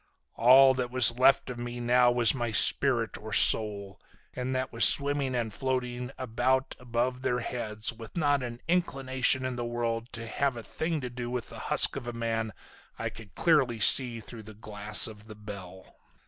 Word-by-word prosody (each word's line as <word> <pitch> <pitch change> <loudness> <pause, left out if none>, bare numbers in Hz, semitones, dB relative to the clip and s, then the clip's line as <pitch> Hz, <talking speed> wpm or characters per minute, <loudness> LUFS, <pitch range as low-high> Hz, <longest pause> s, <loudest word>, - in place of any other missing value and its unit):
All 130 +3 +6
that 125 -1 -3
was 125 -1 +3
left 130 0 +3
of 120 - -8
me 120 0 -6
now 120 +1 +3
was 120 -2 +4
my 120 -3 -3
spirit, 115 +2 +1
or 110 +1 -9
soul. 100 -2 +3 0.3
And 130 +1 -4
that 130 -1 -3
was 115 - +1
swimming 140 -2 +3
and 115 -3 -3
floating 125 0 -3
about 130 +2 -1
above 125 +1 -2
their 125 -1 -1
heads 110 -1 -3
with 115 +6 -11
not 145 -4 +1
an 120 -1 -7
inclination 135 -6 0
in 130 -1 -4
the 120 - -3
world 120 0 -3
to 115 -1 -7
have 135 +2 -2
a 115 - -8
thing 160 +3 -4
to 125 -1 -6
do 120 -1 -6
with 125 -1 -5
the - - -10
husk - - +2
of 135 -3 -6
the 120 - -5
man 115 -1 -3 0.5
I - - -4
could 110 -3 -14
clearly 135 -9 +2
see 120 +2 +4
through 115 +1 -11
the 110 0 -13
glass 105 0 -1
of 105 -1 -9
the 110 - -11
bell. 100 -3 -11
120 Hz, 190 wpm, -28 LUFS, 115-130 Hz, 0.5 s, All